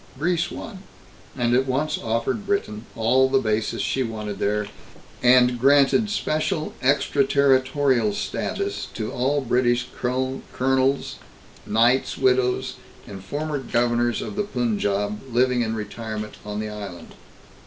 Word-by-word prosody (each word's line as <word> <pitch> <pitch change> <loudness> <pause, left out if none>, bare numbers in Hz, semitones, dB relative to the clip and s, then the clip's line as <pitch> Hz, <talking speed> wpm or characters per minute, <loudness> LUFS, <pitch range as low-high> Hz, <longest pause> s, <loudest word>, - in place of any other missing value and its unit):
Greece 175 +3 0
won, 200 0 -8 0.6
and 120 -1 +1
at 130 +2 +2
once 140 +4 0
offered 115 - -2
Britain 115 - -2
all 125 +4 +3
the 135 - +3
bases 110 -3 0
she 135 - 0
wanted 105 -4 -4
there, 105 +1 0 0.6
and 125 0 +5
granted 140 - +4
special 155 -4 -1
extraterritorial 135 -3 +2
status 100 0 -3
to 110 - -3
all 140 +4 0
British 125 -1 +1
colonels, 130 +1 0 0.5
knights' 120 +4 +2
widows 125 -1 +1 0.3
and 95 -2 -9
former 145 +8 -3
governors 120 -1 0
of 210 - -6
the 210 - 0
Punjab 105 - -1
living 125 +1 +2
in 110 -1 -1
retirement 105 0 -5
on 105 0 -5
the 110 0 -3
island. 100 -5 -8
125 Hz, 120 wpm, -23 LUFS, 110-135 Hz, 0.6 s, and